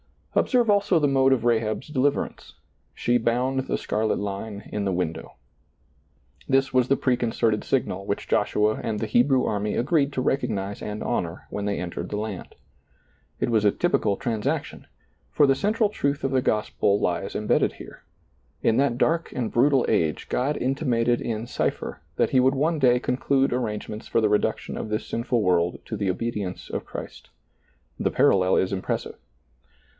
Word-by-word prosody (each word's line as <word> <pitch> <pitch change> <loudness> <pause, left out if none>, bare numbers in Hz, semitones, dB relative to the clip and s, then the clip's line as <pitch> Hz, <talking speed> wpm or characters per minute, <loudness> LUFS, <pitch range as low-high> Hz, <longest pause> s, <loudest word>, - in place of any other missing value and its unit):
Observe 245 -3 +2
also 200 -3 +3
the 150 -2 +3
mode 135 -1 +3
of 120 -4 0
Rahab's 115 +2 0
deliverance 145 -1 -1 0.2
— - - -43
she 120 0 +1
bound 125 +3 0
the - - 0
scarlet 110 +1 -1
line 100 +1 -5
in 105 - -1
the 95 - 0
window. 90 -3 -3 1.1
This 135 0 +2
was 130 -1 +3
the 135 - +3
preconcerted 115 -4 0
signal 100 -7 -1
which 100 - -3
Joshua 105 +1 +1
and 110 -2 -2
the - - -1
Hebrew 125 +4 +3
army 105 0 -1
agreed 140 +2 +1
to 130 - -1
recognize 105 -7 -1
and 105 0 -5
honor 90 -7 -3
when 100 - -3
they 100 -1 -1
entered 90 0 -5
the 105 - -3
land. 105 -3 -5 0.8
It - - 0
was 110 -2 +3
a 105 - +4
^rpical 110 - +1
transaction, 110 -3 -3 0.4
for 145 - +4
the 135 - +4
central 210 - +1
truth 140 -8 -2
of 135 - 0
the 130 -1 +2
gospel 105 -2 +1
lies - - -2
imbedded - - +1
here. - - -12 0.6
In 115 - +3
that 135 -3 +2
dark 165 +5 +1
and 120 -3 -2
brutal 135 +2 +3
age 80 -8 0
God 140 +4 0
intimated 125 -3 +1
in 115 -1 -3
cipher 120 - -3
that - - +1
He 130 - +4
would 130 +2 +3
one 155 +4 +1
day 125 -2 +4
conclude 135 +1 +1
arrangements 110 -2 -4
for - - +1
the 105 - +3
reduction 105 0 0
of - - -5
this 110 +1 -2
sinful 115 -1 -1
world 90 -2 +1
to - - -5
the 100 - -1
obedience 100 -2 -3
of - - -4
Christ. - - -9 0.7
The - - +1
parallel 95 -1 +3
is 95 - +1
impressive. 95 - -3
120 Hz, 170 wpm, -25 LUFS, 105-135 Hz, 1.1 s, a